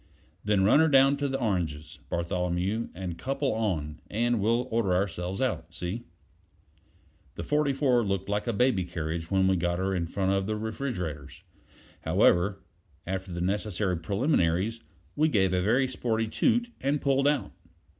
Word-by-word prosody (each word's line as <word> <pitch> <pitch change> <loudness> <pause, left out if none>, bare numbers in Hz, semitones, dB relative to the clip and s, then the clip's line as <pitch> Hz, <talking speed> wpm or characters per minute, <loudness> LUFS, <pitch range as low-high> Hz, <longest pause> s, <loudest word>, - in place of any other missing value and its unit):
"Then 105 -2 +2
run 110 +9 +5
her 160 - +5
down 135 -1 +5
to 145 0 -1
the 135 0 -2
oranges, 85 - -2
Bartholomew, 90 +5 -1
and 90 -2 -5
couple 135 - -1
on, 85 -9 -2
and 120 +2 +1
we'll 115 +4 +1
order 110 -5 +1
ourselves 90 +1 -2
out. 90 -9 -2
See?" 95 +8 -4 1.3
The - - -5
44 140 -4 +2
looked 95 -2 -2
like 105 +3 -2
a - - +2
baby 115 -3 +2
carriage 85 -1 -4
when 95 -1 +3
we 95 -1 +3
got 85 0 0
her 95 +1 -1
in 85 -3 -1
front 95 +2 -1
of 95 0 0
the 110 - -1
refrigerators. 105 - -5 0.6
However, 95 +2 +2 0.4
after 95 0 -4
the 85 0 -4
necessary 95 0 0
preliminaries, 100 - 0 0.4
we 155 +2 +3
gave 95 -7 +2
a 90 - +2
very 120 +8 +2
sporty 115 -3 -1
toot, 240 - +1
and 140 +2 +1
pulled 135 0 +2
out. 145 -3 0
100 Hz, 155 wpm, -28 LUFS, 90-125 Hz, 1.3 s, run